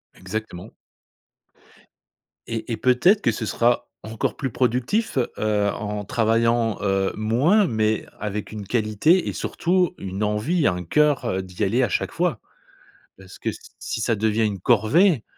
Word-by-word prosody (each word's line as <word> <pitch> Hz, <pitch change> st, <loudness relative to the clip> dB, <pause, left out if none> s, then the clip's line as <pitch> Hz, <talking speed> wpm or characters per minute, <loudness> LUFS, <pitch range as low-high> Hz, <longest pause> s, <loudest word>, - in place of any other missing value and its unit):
Exactement. 90 Hz, -1 st, -6 dB, 1.8 s
Et 115 Hz, +1 st, -4 dB
et 115 Hz, -, -1 dB
peut-être 175 Hz, +12 st, +3 dB
que -, -, +2 dB
ce 110 Hz, 0 st, -4 dB
sera 120 Hz, +3 st, +1 dB, 0.2 s
encore 110 Hz, 0 st, -3 dB
plus 135 Hz, -, -3 dB
productif, 130 Hz, -, 0 dB, 0.2 s
heu, 105 Hz, -1 st, +1 dB
en 105 Hz, -1 st, -4 dB
travaillant, 115 Hz, +1 st, +1 dB
heu, 95 Hz, -1 st, +1 dB
moins 130 Hz, -, +3 dB
mais 110 Hz, -3 st, 0 dB
avec 105 Hz, 0 st, -4 dB
une 105 Hz, -2 st, -7 dB
qualité 115 Hz, -, +2 dB
et -, -, -2 dB
surtout 180 Hz, +1 st, 0 dB
une 95 Hz, +2 st, -4 dB
envie, 120 Hz, +11 st, +1 dB
un 90 Hz, -1 st, -1 dB
cœur, 150 Hz, -, +2 dB
heu, 95 Hz, -, -1 dB
d'y 90 Hz, +3 st, -5 dB
aller 115 Hz, +6 st, +2 dB
à -, -, +1 dB
chaque -, -, -1 dB
fois -, -, -1 dB, 0.8 s
parce 95 Hz, -1 st, -14 dB
que -, -, -3 dB
s -, -, -6 dB, 0.2 s
si -, -, -4 dB
ça 115 Hz, +1 st, +1 dB
devient 110 Hz, +1 st, +1 dB
une 100 Hz, -3 st, -2 dB
corvée 120 Hz, -, +3 dB
110 Hz, 150 wpm, -23 LUFS, 105-125 Hz, 1.8 s, peut-être